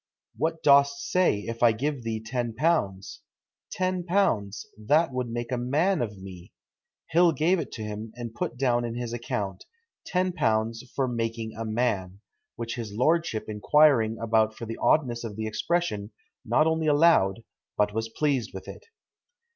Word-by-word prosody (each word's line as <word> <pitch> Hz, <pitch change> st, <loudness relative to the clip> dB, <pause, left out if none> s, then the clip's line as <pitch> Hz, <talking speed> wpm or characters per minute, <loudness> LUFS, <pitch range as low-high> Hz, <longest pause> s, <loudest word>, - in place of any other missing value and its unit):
'What 160 Hz, 0 st, -2 dB
dost 140 Hz, -1 st, +4 dB
say, 180 Hz, -, +3 dB
if 115 Hz, +2 st, -6 dB
I 120 Hz, -2 st, +6 dB
give 140 Hz, +4 st, -2 dB
thee 115 Hz, -1 st, -3 dB
ten 120 Hz, -1 st, -3 dB
pounds?' 105 Hz, -, 0 dB, 0.5 s
'Ten 185 Hz, -1 st, -1 dB
pounds! 170 Hz, -, 0 dB
that 145 Hz, +8 st, +2 dB
would 125 Hz, -1 st, -2 dB
make 120 Hz, +1 st, -4 dB
a 125 Hz, -, 0 dB
man 150 Hz, +10 st, +1 dB
of 105 Hz, -4 st, -3 dB
me!' 95 Hz, -2 st, -11 dB, 0.6 s
Hill 170 Hz, +1 st, +5 dB
gave 165 Hz, +6 st, +2 dB
it 155 Hz, -, -5 dB
him, 110 Hz, 0 st, -6 dB
and 120 Hz, -2 st, -7 dB
put 120 Hz, -, -4 dB
down 120 Hz, -2 st, +1 dB
in 120 Hz, -1 st, -4 dB
his 120 Hz, -1 st, -4 dB
account, 100 Hz, -5 st, -4 dB, 0.5 s
'£10 115 Hz, -12 st, 0 dB, 0.2 s
for 135 Hz, -2 st, +1 dB
making 115 Hz, -2 st, -3 dB
a 115 Hz, +1 st, -4 dB
man,' 110 Hz, -5 st, -1 dB, 0.4 s
which 115 Hz, +1 st, -5 dB
his 115 Hz, -3 st, -5 dB
lordship 130 Hz, +1 st, +1 dB
inquiring 115 Hz, +1 st, +3 dB
about 110 Hz, -1 st, +1 dB
for 115 Hz, -, -7 dB
the 115 Hz, 0 st, -6 dB
oddness 120 Hz, -6 st, +2 dB
of 110 Hz, -3 st, -6 dB
the 110 Hz, +1 st, -4 dB
expression, 110 Hz, -3 st, -1 dB, 0.3 s
not 120 Hz, +7 st, +3 dB
only 160 Hz, 0 st, +1 dB
allowed, 145 Hz, -, +4 dB, 0.3 s
but 105 Hz, 0 st, +2 dB
was 110 Hz, +1 st, -2 dB
pleased 135 Hz, -3 st, -1 dB
with 95 Hz, -, -8 dB
it." -, -, -10 dB
120 Hz, 160 wpm, -26 LUFS, 110-150 Hz, 0.6 s, I